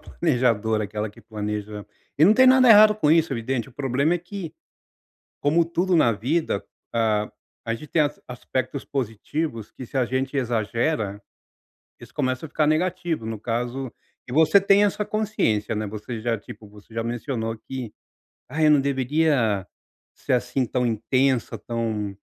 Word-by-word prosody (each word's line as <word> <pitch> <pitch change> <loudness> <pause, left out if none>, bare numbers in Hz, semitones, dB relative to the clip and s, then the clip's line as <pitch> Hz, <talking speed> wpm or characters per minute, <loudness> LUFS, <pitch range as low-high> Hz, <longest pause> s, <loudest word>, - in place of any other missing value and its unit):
planejadora, 115 -8 0
aquela 105 +1 -4
que 115 - -17
planeja 105 -1 -5 0.3
E 155 - +7
não 205 - +7
tem 260 +2 +6
nada 255 -1 +6
errado 215 -1 +8
com 155 -8 +1
isso, 165 -2 +3
evidente, 120 +1 -2
o - - -17
problema 140 +4 0
é 175 - 0
que, 180 -1 -7 0.9
como 160 +4 +3
tudo 175 +2 0
na 120 -8 +4
vida, 125 +1 -1 0.3
ah, 110 -2 +1 0.3
a 115 0 -1
gente 150 +6 -10
tem 160 - +3
as 145 0 -2
aspectos 130 +2 -4
positivos 120 0 -3
que, 130 - -9
se 135 - -7
a 130 - +3
gente 130 +3 -2
exagera, 115 -2 -1 0.8
isso - - -14
começa 130 +3 -1
a 155 - -9
ficar 155 0 +1
negativo, 170 -4 0
no 110 -1 -4
caso 120 +3 -3 0.4
E - - -8
você 160 +6 +6
tem 200 +1 +4
essa 205 +1 -1
consciência, 115 - 0
né, 105 0 -2
você 110 +3 -6
já, 115 -1 0
tipo, 105 +1 -12
você 105 +2 -17
já 115 0 -2
mencionou 115 -1 -3
que: 120 -1 -7 0.6
"Ah, 150 +5 -4
eu 155 - +6
não 150 -2 +5
deveria 135 - +1 0.5
ser - - -4
assim 125 +1 +1
tão 125 +2 -1
intensa, 125 +2 +1
tão" 110 -3 -3
125 Hz, 165 wpm, -24 LUFS, 110-155 Hz, 0.9 s, errado